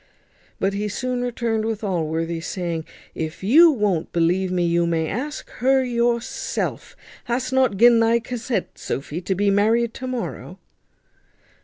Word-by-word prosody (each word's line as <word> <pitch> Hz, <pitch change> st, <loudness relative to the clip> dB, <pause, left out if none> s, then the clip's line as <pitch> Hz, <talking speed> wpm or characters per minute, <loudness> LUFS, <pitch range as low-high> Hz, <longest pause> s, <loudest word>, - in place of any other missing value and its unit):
But 195 Hz, +1 st, 0 dB
he 205 Hz, +1 st, -2 dB
soon 250 Hz, +4 st, -2 dB
returned 235 Hz, -2 st, -1 dB
with 220 Hz, -1 st, -3 dB
Allworthy, 165 Hz, -3 st, -2 dB
saying, 170 Hz, -3 st, -3 dB, 0.3 s
"If 160 Hz, +3 st, -5 dB
you 310 Hz, -, +7 dB
won't 210 Hz, -, 0 dB
believe 180 Hz, +2 st, +1 dB
me, 180 Hz, -1 st, +1 dB
you 170 Hz, 0 st, +2 dB
may 165 Hz, -1 st, 0 dB
ask 280 Hz, -, -4 dB
her 265 Hz, +1 st, +4 dB
yourself. 235 Hz, -1 st, -2 dB, 0.3 s
Hast 255 Hz, +2 st, -2 dB
nut 260 Hz, -6 st, +2 dB
gin 235 Hz, +2 st, +6 dB
thy 230 Hz, +1 st, +4 dB
consent, 235 Hz, -3 st, -4 dB
Sophy, 145 Hz, +5 st, -4 dB
to 190 Hz, +2 st, -1 dB
be 200 Hz, +1 st, +2 dB
married 225 Hz, +3 st, +2 dB
to 260 Hz, -, -6 dB
morrow?" 255 Hz, -2 st, -5 dB
215 Hz, 145 wpm, -22 LUFS, 175-240 Hz, 0.3 s, you